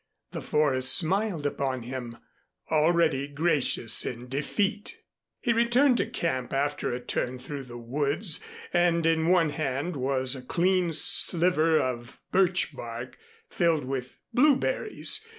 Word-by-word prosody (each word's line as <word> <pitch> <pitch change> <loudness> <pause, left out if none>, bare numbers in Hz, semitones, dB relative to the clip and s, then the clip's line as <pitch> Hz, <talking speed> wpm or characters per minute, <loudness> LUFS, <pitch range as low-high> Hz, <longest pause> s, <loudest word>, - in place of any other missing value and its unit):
The - - -5
forest 130 -4 +2
smiled 190 -2 -1
upon 135 -3 -2
him, 120 -1 -6 0.5
already 155 -3 +2
gracious 145 -6 0
in 125 +1 -6
defeat. 200 - -2 0.4
He 240 - +1
returned 240 +3 +3
to - - 0
camp 165 - -3
after 145 +2 -1
a 120 - -3
turn 125 +1 -3
through 135 +2 -7
the 120 -1 -9
woods, 145 - -1 0.3
and 175 -1 +2
in 165 0 +2
one 170 -4 +3
hand 145 +3 -3
was 130 0 -1
a 130 - -7
clean 180 +5 +1
sliver 165 0 +4
of 120 0 -4
birch 185 -5 +2
bark, 120 +1 -8 0.3
filled 165 - +1
with 130 -1 -5 0.2
blueberries. 305 - +2
150 Hz, 130 wpm, -27 LUFS, 130-180 Hz, 0.5 s, sliver